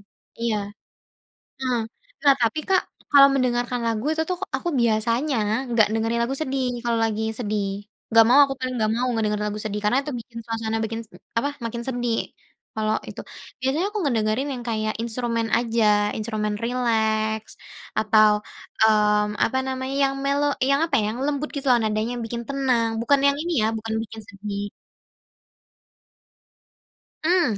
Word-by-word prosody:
Mhm, - - -41
iya, 230 -2 +1 1.1
mmm. 255 -2 0 0.5
Nah 280 -1 +7
tapi, 230 +6 +1
Kak, 380 -1 +4 0.3
kalau 280 -1 +8
mendengarkan 245 -1 0
lagu 225 0 -1
itu 320 - 0
tuh 360 - -1 0.2
aku 345 - -4
biasanya 235 +5 +1 0.4
nggak 225 -2 +4
dengerin 225 +1 0
lagu 255 +3 -1
sedih 265 -2 -1 0.2
kalau 235 -1 +1
lagi 220 -1 -1 0.2
sedih. 210 -3 -1 0.4
Nggak 225 0 +7
mau, 260 +4 +6
aku 270 -1 -3
paling 255 -1 -3
nggak 215 0 +1
mau 250 +1 0
ngedengerin 210 -2 0
lagu 210 +1 -4
sedih 210 -1 -3
karena 245 +6 +3
itu 295 - -5
bikin 230 0 -11
suasana 225 -1 -2
bikin 225 +1 -3 0.4
apa, 285 - 0 0.2
makin 235 +1 -4
sedih 240 -2 -1 0.6
kalau 215 0 0
itu. - - -7 0.4
Biasanya 275 +8 0
aku 425 - -3
ngedengerin 235 0 0
yang 245 -2 -5
kayak 215 -1 -1
instrumen 230 -1 -1
aja. 230 -1 +1 0.3
Instrumen 210 -1 -2
rileks 220 -3 0 0.5
atau, 215 -1 +5 0.5
mmm, 210 -1 +3
apa 260 +3 0
namanya 260 +1 -3
yang 270 - +1
mellow, 285 +1 +2 0.2
yang 280 +2 +3
apa 330 - -2
ya, 210 - -1
yang 235 - -5
lembut 295 +1 -1
gitu, 280 0 -4 0.2
nadanya 215 +2 -1
bikin 235 +1 -4
tenang 255 -4 +1
bukan 275 +4 +3
yang 280 - +3
ini 345 +1 -2
ya, - - +3
bukan 220 0 -4
bikin 225 0 -9
sedih. 200 0 -5 2.6
Mmm, 355 +1 +4
230 Hz, 155 wpm, -24 LUFS, 220-265 Hz, 2.6 s, kalau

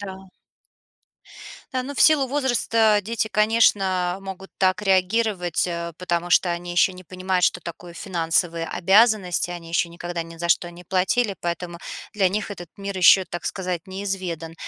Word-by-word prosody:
Да. 190 -1 -9 1.4
Да, 255 -1 -1
ну, 285 - -6
в - - -2
силу 300 -4 +5
возраста 235 -5 +2
дети, 220 +1 -2
конечно, 195 -4 +2
могут 195 0 -9
так 185 +1 +2
реагировать, 190 -2 +1
э, 170 0 -4
потому 175 -1 -2
что 175 - +4
они 175 0 -4
ещё 175 +2 +4
не 185 0 -12
понимают, 185 0 -1
что - - +1
такое 170 0 -9
финансовые 170 -2 -1
обязанности, 190 -2 +3
они 170 -1 -8
ещё 170 +1 0
никогда 170 0 -5
ни 165 0 -12
за 170 +1 -3
что 175 +1 +2
не 175 - -12
платили, 190 +4 0
поэтому 175 0 -4 0.4
для 195 -3 +3
них 210 +3 -3
этот 175 -3 -7
мир 200 -1 -5
ещё, 185 +1 +6
так 175 0 -5
сказать, 180 -3 -3
неизведан. 185 -4 -4
185 Hz, 160 wpm, -23 LUFS, 175-205 Hz, 1.4 s, ещё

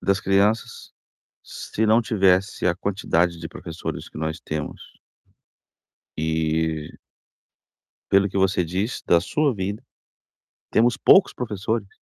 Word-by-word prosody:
das 100 +1 +1
crianças 100 +4 0 0.5
se 110 - -3
não 110 +2 +4
tivesse 95 -3 +1
a 90 - +3
quantidade 90 -3 0
de 80 - -6
professores 80 -3 -7
que - - -12
nós 80 0 -3
temos? 75 -1 -5 1.4
E 80 -1 -1 1.1
pelo 100 0 +4
que 100 - -4
você 95 -2 +2
diz, 95 +8 -3
da 85 -1 +4
sua 145 - 0
vida, 100 +4 -4 0.9
temos 115 +1 +3
poucos 195 - +5
professores, 110 -2 -3
95 Hz, 115 wpm, -23 LUFS, 80-105 Hz, 1.4 s, poucos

